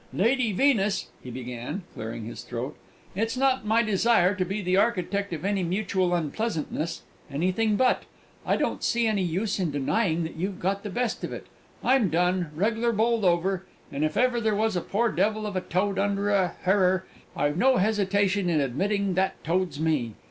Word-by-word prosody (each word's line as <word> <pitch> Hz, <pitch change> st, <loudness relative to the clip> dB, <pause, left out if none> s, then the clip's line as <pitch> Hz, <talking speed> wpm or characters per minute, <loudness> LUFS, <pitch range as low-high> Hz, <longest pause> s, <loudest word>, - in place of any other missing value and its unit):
"Lady 235 Hz, +3 st, +2 dB
Venus," 210 Hz, -3 st, +2 dB
he 125 Hz, -, -8 dB
began, 125 Hz, -, -5 dB
clearing 110 Hz, 0 st, -6 dB
his 115 Hz, -, -7 dB
throat, 125 Hz, +4 st, -5 dB, 0.4 s
"it's 225 Hz, +5 st, -1 dB
not 260 Hz, -4 st, +1 dB
my 225 Hz, +2 st, +4 dB
desire 210 Hz, -3 st, +3 dB
to 195 Hz, -2 st, -1 dB
be 195 Hz, +3 st, -3 dB
the 185 Hz, -2 st, 0 dB
architect 200 Hz, -1 st, +1 dB
of 165 Hz, +1 st, -4 dB
any 200 Hz, -1 st, +1 dB
mutual 185 Hz, 0 st, 0 dB
unpleasantness 165 Hz, -1 st, -2 dB, 0.3 s
anything 185 Hz, +9 st, +1 dB
but! 250 Hz, +4 st, +3 dB, 0.4 s
I -, -, +1 dB
don't -, -, -1 dB
see 235 Hz, 0 st, +2 dB
any 215 Hz, -3 st, +1 dB
use 190 Hz, +4 st, -1 dB
in 180 Hz, -4 st, 0 dB
denying 160 Hz, +5 st, 0 dB
that 160 Hz, -, -5 dB
you've 190 Hz, +3 st, -3 dB
got 195 Hz, +2 st, -1 dB
the 205 Hz, -, -5 dB
best 240 Hz, +2 st, -2 dB
of -, -, -3 dB
it. -, -, -7 dB, 0.4 s
I'm 255 Hz, -7 st, +3 dB
done 180 Hz, +1 st, +1 dB
reg'lar 225 Hz, +6 st, +1 dB
bowled 230 Hz, 0 st, +1 dB
over; 180 Hz, +1 st, +1 dB, 0.2 s
and 140 Hz, +2 st, -2 dB
if 155 Hz, 0 st, -1 dB
ever 250 Hz, -1 st, +2 dB
there 215 Hz, -2 st, +1 dB
was 220 Hz, 0 st, +1 dB
a 175 Hz, -, 0 dB
poor 225 Hz, +6 st, 0 dB
devil 215 Hz, +1 st, 0 dB
of 205 Hz, -2 st, -4 dB
a 185 Hz, -, 0 dB
toad 190 Hz, +3 st, -1 dB
under 200 Hz, 0 st, 0 dB
a 185 Hz, -4 st, +1 dB
harrer, 185 Hz, -1 st, +3 dB, 0.3 s
I've 145 Hz, +1 st, +1 dB
no 260 Hz, +5 st, +4 dB
hesitation 200 Hz, -2 st, +1 dB
in 160 Hz, -3 st, +2 dB
admitting 195 Hz, -, 0 dB
that 190 Hz, +1 st, -1 dB
toad's 170 Hz, -3 st, -1 dB
me! 145 Hz, -9 st, 0 dB
190 Hz, 185 wpm, -26 LUFS, 170-215 Hz, 0.4 s, my